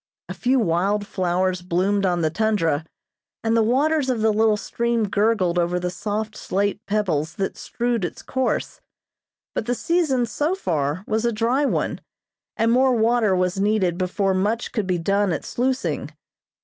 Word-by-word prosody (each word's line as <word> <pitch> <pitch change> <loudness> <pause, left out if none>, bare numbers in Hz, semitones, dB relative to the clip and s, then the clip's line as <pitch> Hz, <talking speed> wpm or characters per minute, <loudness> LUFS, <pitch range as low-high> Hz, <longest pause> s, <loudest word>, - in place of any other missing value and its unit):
A - - -5
few 255 +2 +1
wild 200 +2 +1
flowers 185 -2 0
bloomed 190 +3 +1
on 175 -2 0
the 155 - +1
tundra, 165 -6 0 0.6
and 225 0 +1
the 230 - +4
waters 275 +5 +2
of 240 -4 0
the 220 0 +3
little 215 0 +3
stream 235 0 -1
gurgled 200 -4 +1
over 175 +1 0
the 180 0 -2
soft 215 +4 -3
slate 200 +2 -1
pebbles 175 -7 0
that 195 - -2
strewed 240 -3 -2
its 175 - -5
course; 260 -1 -2 0.7
but 220 - -3
the 245 - +1
season 305 -6 +1
so 295 - -1
far 160 - -1
was 220 +1 0
a 235 - +2
dry 235 +6 +1
one, - - -1 0.6
and 230 +1 +2
more 255 +1 +4
water 225 -3 +3
was 185 +1 0
needed 195 -4 +1
before 190 +1 0
much 210 +5 -1
could 215 -5 -2
be 180 -1 +1
done 195 +3 +1
at - - -3
sluicing. 245 - -1
210 Hz, 165 wpm, -23 LUFS, 180-235 Hz, 0.7 s, the